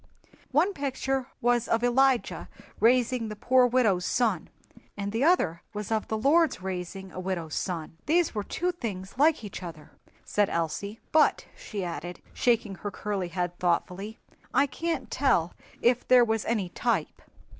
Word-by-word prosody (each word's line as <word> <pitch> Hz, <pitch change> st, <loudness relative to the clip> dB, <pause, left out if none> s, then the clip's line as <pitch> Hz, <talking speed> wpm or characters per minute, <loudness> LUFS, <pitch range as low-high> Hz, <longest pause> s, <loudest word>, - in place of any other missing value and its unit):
"One 330 Hz, +9 st, +3 dB
picture 270 Hz, -3 st, -2 dB
was 240 Hz, 0 st, +2 dB
of 230 Hz, +1 st, +1 dB
Elijah 255 Hz, +1 st, +2 dB, 0.3 s
raising 240 Hz, 0 st, +3 dB
the 210 Hz, -, -5 dB
poor 250 Hz, +3 st, +4 dB
widow's 225 Hz, -8 st, +2 dB
son, 215 Hz, -4 st, 0 dB, 0.5 s
and 200 Hz, 0 st, -3 dB
the 225 Hz, +4 st, 0 dB
other 200 Hz, -, +3 dB
was 210 Hz, +1 st, -5 dB
of 220 Hz, -1 st, 0 dB
the 220 Hz, -, -1 dB
Lord's 300 Hz, -, +3 dB
raising 190 Hz, +1 st, -5 dB
a -, -, -7 dB
widow's 175 Hz, -4 st, -3 dB
son. 165 Hz, -3 st, -4 dB
These 335 Hz, +2 st, +3 dB
were 210 Hz, -, -1 dB
two 360 Hz, -, -1 dB
things 205 Hz, -, -6 dB
like 305 Hz, -4 st, +4 dB
each 200 Hz, -3 st, -7 dB
other," 160 Hz, -3 st, -9 dB, 0.3 s
said 205 Hz, -1 st, +1 dB
Elsie; 185 Hz, +6 st, -3 dB
"but," 310 Hz, -1 st, +4 dB
she 205 Hz, -3 st, -5 dB
added, 175 Hz, 0 st, -5 dB
shaking 230 Hz, -4 st, +1 dB
her 205 Hz, -, -3 dB
curly 200 Hz, -2 st, -3 dB
head 175 Hz, 0 st, -3 dB
thoughtfully, 180 Hz, +4 st, -1 dB, 0.4 s
"I 275 Hz, +2 st, +5 dB
can't 320 Hz, 0 st, -3 dB
tell 250 Hz, -12 st, +2 dB, 0.3 s
if 245 Hz, +1 st, +3 dB
there 250 Hz, -1 st, +7 dB
was 220 Hz, -1 st, -1 dB
any 215 Hz, -6 st, 0 dB
type." 235 Hz, +6 st, -1 dB
220 Hz, 155 wpm, -28 LUFS, 185-255 Hz, 0.5 s, there